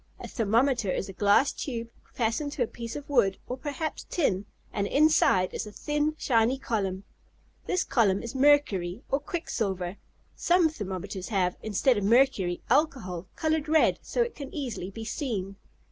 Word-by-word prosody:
A - - -7
thermometer 230 0 +1
is 185 - -1
a - - -7
glass 205 +8 +4
tube, 235 -4 -5 0.2
fastened 245 +5 -1
to 250 - 0
a - - -2
piece 230 0 -7
of 290 -1 -7
wood 220 -9 +2
or 250 - -4
perhaps 295 +3 -4
tin, 205 - 0 0.3
and 200 -1 -1
inside 290 - +3
is - - -4
a - - -8
thin, 295 +6 -1
shiny 240 -1 +2
column. 200 -7 -2 0.6
This 365 0 +1
column 200 -5 +2
is 235 - -6
mercury, 260 -9 +2
or 275 - +2
quicksilver. 200 - -3 0.4
Some 345 -2 +3
thermometers 195 - -5
have, 185 -5 0
instead 220 +3 +2
of - - -4
mercury, 210 -6 +3
alcohol, 190 - 0
colored 315 -1 0
red, 315 0 +4
so 485 - 0
it 475 - -5
can 280 -2 -8
easily 250 - -4
be 225 +3 -8
seen. 210 -6 -3
230 Hz, 160 wpm, -28 LUFS, 195-290 Hz, 0.6 s, glass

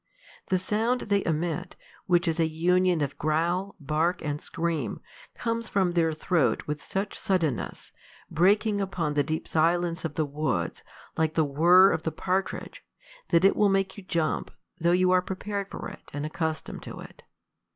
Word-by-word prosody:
The 185 - +2
sound 220 +6 0
they 200 -1 +1
emit, 170 +2 -2 0.3
which 175 0 +3
is 165 0 0
a 165 - +3
union 175 +1 +2
of 140 -1 -3
growl, 170 +6 0
bark, 160 +4 0
and 150 -1 -3
scream, 165 -9 -2 0.4
comes 230 0 -2
from 190 -3 +2
their 165 -2 +2
throat 155 -6 +1
with 150 0 -4
such 195 +1 -3
suddenness, 165 - -1 0.4
breaking 200 +4 +2
upon 175 -6 -2
the 145 - +2
deep 155 +3 -3
silence 170 +2 +1
of 160 -3 -4
the 155 - +1
woods, 145 -1 -2 0.4
like 160 0 +1
the 160 - +3
whirr 175 +7 +6
of 160 - -1
the 160 - -2
partridge, 185 +5 -3 0.5
that 170 +3 +4
it 195 - +5
will 210 -1 +4
make 195 0 +1
you 205 - -9
jump, 165 -4 -1 0.3
though 170 +1 +3
you 180 +1 +3
are 185 0 +5
prepared 200 +2 -4
for - - -6
it - - -11
and 145 +1 -3
accustomed 160 0 -3
to - - -8
it. - - -12
170 Hz, 170 wpm, -27 LUFS, 155-190 Hz, 0.5 s, whirr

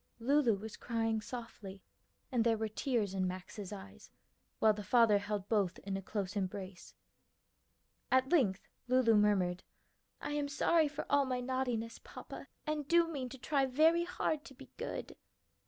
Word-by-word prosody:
Lulu 255 -1 +3
was 215 +2 -8
crying 225 -2 -1
softly, 215 -5 -8 0.5
and 240 -3 +2
there 225 -1 +3
were 220 0 -1
tears 215 -2 -1
in 185 -1 0
Max's 185 +2 -6
eyes, 95 - -10 0.5
while 220 -1 +5
the 210 - -6
father 215 0 +5
held 205 -1 -3
both 200 -5 +1
in 195 -1 -3
a 195 - -3
close 200 0 -3
embrace. 190 -1 -5 1.2
At 260 +1 +3
length 220 - +2 0.2
Lulu 250 -2 +4
murmured, 195 -4 +3 0.6
"I - - -4
am 295 -1 -1
sorry 310 +2 +3
for 290 0 -5
all 285 -1 +3
my 255 -1 -1
naughtiness, 245 -3 -2
papa, - - -9 0.2
and 305 -2 -2
do 340 +1 +5
mean 270 -6 -4
to 265 - -9
try 275 +1 +1
very 320 +6 +4
hard 315 -4 -1
to 270 - -12
be - - -14
good." - - -5
230 Hz, 160 wpm, -34 LUFS, 200-270 Hz, 1.2 s, while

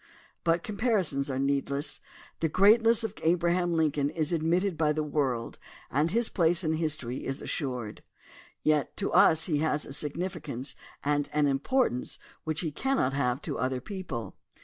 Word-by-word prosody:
But 170 0 +2
comparisons 200 - 0
are 130 - -2
needless. 140 +1 0 0.4
The 160 - +1
greatness 225 +6 +5
of 220 -3 -3
Abraham 175 +1 +2
Lincoln 150 -3 +1
is 155 +1 -1
ad 165 - 0
mitted 175 +3 +1
by 155 -1 +2
the 155 0 -1
world 135 -6 -2 0.3
and 150 +5 +2
his 230 +5 +2
place 175 0 +3
in 160 -1 +1
history 150 -6 -2
is 135 +2 -3
assured. 125 -7 -4 0.6
Yet 150 -2 +1
to 200 - -2
us 160 0 +6
he 150 -5 0
has 150 -1 0
a - - -7
significance 150 -4 -3 0.3
and 145 0 +1
an 150 0 +3
importance 140 - 0 0.3
which 155 -2 -1
he 160 -4 -2
cannot 265 - 0
have 130 -1 0
to 145 - -3
other 130 0 0
people. 135 - -6
155 Hz, 160 wpm, -28 LUFS, 140-175 Hz, 0.6 s, us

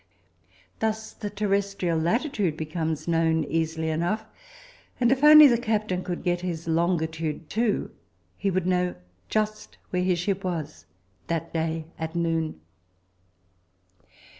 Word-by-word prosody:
Thus 220 0 -2
the 205 - -5
terrestrial 200 -4 0
latitude 200 - 0
becomes 160 0 -3
known 165 -1 +2
easily 160 +1 -1
enough, 175 +8 -1 0.7
and 240 -1 +3
if 265 +1 +1
only 305 0 +10
the 240 -4 +5
captain 215 -6 -1
could 180 -1 -4
get 175 -1 0
his 170 -2 -4
longitude 160 -2 -1
too, 225 0 0 0.4
he 200 - -1
would 185 -1 0
know 180 -1 +1 0.3
just 215 0 -2
where 180 - 0
his 180 -1 +2
ship 190 +2 -1
was 160 -5 -4 0.4
that 165 0 -3
day 160 -1 -1
at 160 +1 -4
noon. 165 - -1
175 Hz, 125 wpm, -26 LUFS, 160-205 Hz, 0.7 s, only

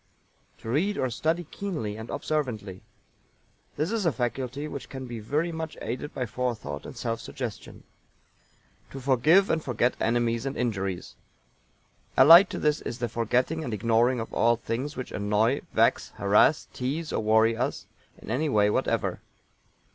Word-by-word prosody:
To 110 - -9
read 195 +10 +1
or 130 -2 0
study 160 +8 0
keenly 155 - -4
and 110 +1 -8
observantly. 110 -11 -3 1.0
This 155 +6 -1
is 225 -2 0
a 165 - +3
faculty 130 +4 -3
which 140 -2 -7
can 130 -1 -7
be 120 -2 -6
very 150 +10 -1
much 160 -1 -5
aided 125 +6 -4
by 125 - -3
forethought 110 - -4
and 130 - -10
self 115 -1 -2
suggestion. 120 -3 -7 1.1
To 135 - -8
forgive 140 +9 +4
and 160 - 0
forget 125 0 +1
enemies 115 +2 0
and 135 - -4
injuries. 95 -7 -2 1.0
Allied 170 +8 +9
to - - -5
it 150 -1 +1
is 115 - -4
the 120 -2 -2
forgetting 125 +8 0
and 120 -7 -3
ignoring 115 +4 +2
of 115 - -6
all 120 +1 +3
things 125 +6 -4
which 130 - -5
annoy, 105 +6 +1
vex, - - +2
harrass, 105 +9 +3
tease 150 +6 -3
or - - 0
worry 110 +1 +4
us 130 +4 -2 0.3
in - - -8
any 150 +6 0
way 105 -4 +3
whatever. - - -1
125 Hz, 155 wpm, -27 LUFS, 115-150 Hz, 1.1 s, Allied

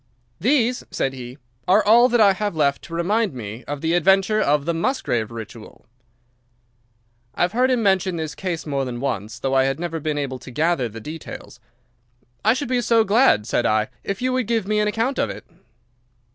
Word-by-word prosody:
"These," 250 0 +1
said 135 - -2
he, 125 0 -9 0.3
"are 200 +4 +4
all 235 +4 +6
that 240 -1 +2
I 200 -3 +6
have 205 -1 -3
left 140 -3 +1
to 165 - -7
remind 200 - 0
me 110 0 -7
of 145 -1 -5
the 165 +1 0
adventure 195 +5 +3
of 145 0 +1
the 170 - 0
Musgrave 165 - -1
Ritual." 115 -1 -10 1.5
I - - +1
had 175 - +1
heard 250 +4 +2
him 250 -3 +1
mention 190 -2 +2
the 160 -1 -3
case 180 -4 -4
more 140 -3 -1
than 125 -2 -5
once, 115 -4 -3
though 135 +2 -2
I 135 0 +4
had 135 +2 -1
never 165 -1 -3
been 150 -1 -2
able 135 -3 -3
to - - -11
gather 150 -2 0
the 115 +1 -9
details. 150 -3 -9 0.8
"I 220 +3 +4
should 275 +1 -3
be 250 0 +1
so 230 -1 +3
glad," 210 - +3
said 120 - 0
I, 110 0 +1
"if 200 +4 -4
you 255 0 +1
would 255 -4 -1
give 225 -4 0
me 210 0 +1
an 210 - +2
account 230 +5 -1
of - - +1
it." - - -8
170 Hz, 200 wpm, -22 LUFS, 135-220 Hz, 1.5 s, all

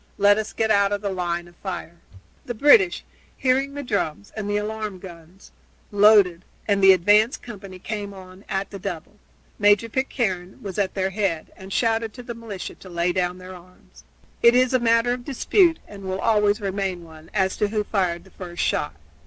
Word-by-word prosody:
"Let 205 +1 +5
us 215 0 -4
get 220 -1 0
out 200 -1 +3
of 205 -1 -1
the 200 -2 -2
line 175 -2 -2
of 175 - -18
fire." 180 -3 -6 0.5
The 240 - -4
British, 215 -9 +5 0.3
hearing 270 +2 +1
the 285 - -4
drums 200 - -2
and 210 -2 -4
the 205 - +1
alarm 210 -1 -4
guns, 175 0 -13 0.4
loaded, 200 -4 +5 0.2
and 200 -2 +2
the 195 - +9
advance 205 - +4
company 195 -5 -10
came 205 +1 -5
on 185 0 -13
at 195 0 -2
the 200 - -7
double. 190 +1 -6 0.4
Major 205 +2 +4
Pitcairne 215 -8 -2
was 195 -1 -5
at 190 -2 -1
their 190 0 -1
head 190 -5 -2
and 190 +1 -11
shouted 225 +1 0
to 250 - -10
the 240 -1 -6
militia 225 -5 -7
to 185 - -14
lay 175 0 0
down 180 0 -1
their 185 0 -10
arms. 180 0 -17 0.4
It 235 +1 +6
is 255 0 +3
a 255 - +4
matter 230 +1 +3
of 245 0 -6
dispute, 330 - +2
and 200 -1 -11
will 190 0 -3
always 210 -1 +2
remain 195 -3 -3
one, 160 -1 -14
as 190 -2 0
to 210 - +1
who 210 0 -1
fired 185 -5 -1
the 190 - -19
first 175 -2 -5
shot. - - -1
200 Hz, 195 wpm, -23 LUFS, 185-220 Hz, 0.5 s, the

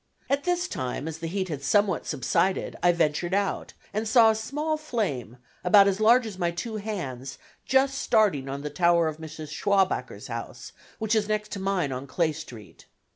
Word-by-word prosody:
At 280 +3 +1
this 355 0 +1
time, 130 - -4
as 160 0 -5
the 165 - -4
heat 190 +2 -2
had 145 -4 -4
somewhat 200 +3 +1
subsided, 160 +7 0
I 175 - +5
ventured 170 +2 0
out, 200 -1 -1 0.2
and 215 +2 -1
saw 225 0 +6
a - - -1
small 295 +8 -2
flame, 195 - -3 0.3
about 200 -2 +7
as 195 0 +1
large 230 +3 +5
as 200 -4 -7
my 175 -1 +1
two 215 +6 -4
hands, 135 - -5 0.3
just 270 +1 +3
starting 155 -12 +2
on 140 +1 -5
the 150 - -4
tower 170 +1 +3
of 155 -1 -4
Mrs. 155 -1 -8
Schwabacher's 195 +3 0
house, - - -7 0.3
which 220 0 -1
is 215 -2 +2
next 215 0 -2
to 200 - -4
mine 190 -7 0
on 130 +2 -5
Clay 160 +4 +1
Street. 115 - -11
190 Hz, 185 wpm, -26 LUFS, 150-215 Hz, 0.3 s, about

